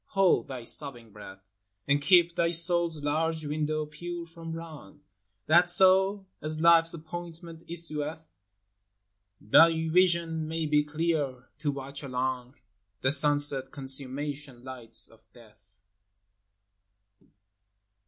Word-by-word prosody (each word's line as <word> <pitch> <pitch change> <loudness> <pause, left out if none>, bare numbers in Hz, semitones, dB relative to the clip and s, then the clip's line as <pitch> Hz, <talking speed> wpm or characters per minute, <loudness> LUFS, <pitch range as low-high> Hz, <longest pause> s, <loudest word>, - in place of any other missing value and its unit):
hold 195 -5 0
thy 130 -4 -9
sobbing 120 -3 -1
breath, 100 -1 -15 0.3
And 140 +1 0
keep 175 +1 +2
thy 170 - 0
soul's 170 -2 +3
large 160 +2 -3
window 155 +1 -4
pure 170 +3 -9
from 165 0 -12
wrong, 155 -3 -12 0.2
— 100 +1 -52
That 175 +2 +3
so, 190 +2 +3 0.2
as 155 0 -4
life's 165 0 +4
appointment 165 0 -11
issueth 160 - -4 1.0
Thy 160 +8 +2
vision 170 -2 0
may 160 0 -4
be 150 -1 +1
clear 150 -4 -4
to 150 -1 -3
watch 140 0 -7
along 130 -1 -5 0.5
The 130 - +1
sunset 145 -2 +4
consummation 135 0 +1
lights 120 -4 -2
of 110 0 -21
death. 105 -4 -22
150 Hz, 115 wpm, -26 LUFS, 135-165 Hz, 1.0 s, life's